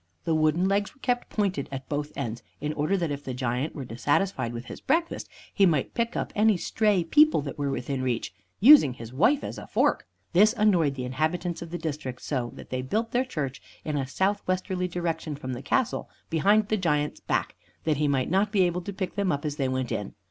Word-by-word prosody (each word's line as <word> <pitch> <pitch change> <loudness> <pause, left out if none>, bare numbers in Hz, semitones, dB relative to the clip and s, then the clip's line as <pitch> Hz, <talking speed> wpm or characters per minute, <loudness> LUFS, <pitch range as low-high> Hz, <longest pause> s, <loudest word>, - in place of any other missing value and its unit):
The 165 - 0
wooden 155 +3 +2
legs 200 +1 0
were - - -26
kept 245 -1 0
pointed 195 -9 -1
at 135 -1 -6
both 145 0 -3
ends, 120 -4 -4 0.2
in 150 +1 -2
order 155 +6 +1
that 170 -4 -1
if 140 0 -4
the 130 - -5
Giant 125 +3 -2
were 140 -4 -5
dissatisfied 130 - 0
with 120 +1 -6
his - - -9
breakfast, 330 +4 0 0.2
he 195 -2 +5
might 155 -6 0
pick 235 0 -1
up - - -3
any 210 -1 +4
stray 205 0 +1
people 300 - +5
that 140 0 -6
were 140 -1 0
within 135 0 -2
reach, 125 -3 -2 0.3
using 230 - +8
his 115 -1 -9
wife 245 - +3
as - - -5
a - - -10
fork; - - +1 0.3
this 210 +5 +6
annoyed 175 -10 +3
the 130 -2 -4
inhabitants 160 +6 -1
of 170 - -7
the 175 - -4
district, 145 -6 -5
so 125 -5 -2
that - - -12
they 130 0 -1
built 220 - -1
their 250 +1 +2
church 145 - -4 0.2
in 150 - -2
a 135 -2 -1
southwesterly 185 +2 -1
direction 165 -3 -3
from 130 -3 -5
the 125 - -5
castle, 255 - 0 0.2
behind 205 +6 +3
the 215 - +2
Giant's 150 -5 0
back, - - -1 0.3
that 155 -3 +1
he 150 0 +1
might 135 0 0
not 200 +3 +2
be 200 -4 +4
able 175 0 0
to 200 +3 -6
pick 190 -1 -3
them 200 -3 0
up 145 0 -2
as 150 -1 -3
they 135 -3 0
went 130 -2 -2
in. 105 - -3
160 Hz, 220 wpm, -27 LUFS, 135-195 Hz, 0.3 s, using